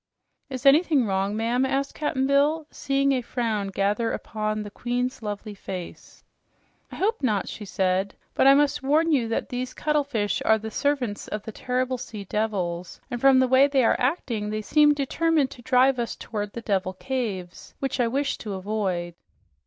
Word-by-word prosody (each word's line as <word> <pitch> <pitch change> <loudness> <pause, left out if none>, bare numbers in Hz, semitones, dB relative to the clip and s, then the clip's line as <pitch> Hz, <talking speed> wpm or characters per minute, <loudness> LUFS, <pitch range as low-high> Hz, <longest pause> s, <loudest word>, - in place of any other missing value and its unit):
"Is 260 -1 -6
anything 290 -2 +5
wrong, 195 +1 -1
ma'am?" 235 +3 +1
asked 270 +1 -1
Cap'n 295 -3 -1
Bill, 290 +3 +2
seeing 275 0 +1
a 260 -2 +1
frown 225 -4 -2
gather 205 +4 0
upon 215 -1 -3
the 205 - -8
queen's 245 +3 -2
lovely 210 0 -5
face. 185 -3 -8 0.7
"I - - -8
hope 440 +4 0
not," 215 -7 0
she 210 - -7
said. 190 0 0 0.2
"But - - +4
I 275 - +8
must 290 0 +2
warn 310 +5 +2
you 255 -6 +2
that 225 - -2
these 250 +1 -4
cuttlefish 285 -9 0
are 220 - +4
the 220 0 -7
servants 255 -6 -1
of 210 -1 -4
the 220 - -7
terrible 255 +2 -2
sea 220 -4 -7
devils, 185 -4 -2
and 240 -1 -3
from 270 -1 +6
the 260 0 +4
way 260 +2 +6
they 275 -2 +2
are - - +3
acting 245 -6 -1
they 215 0 -3
seem 295 +5 +4
determined 295 0 +1
to 245 - -11
drive 255 +2 +3
us 235 - -2
toward 210 -2 -5
the 235 - -5
Devil 190 -4 -1
Caves, 195 -6 -5
which 270 -1 -3
I 240 - +3
wished 275 +4 -1
to 210 -3 -5
avoid." 190 -3 -2
240 Hz, 180 wpm, -25 LUFS, 210-275 Hz, 0.7 s, I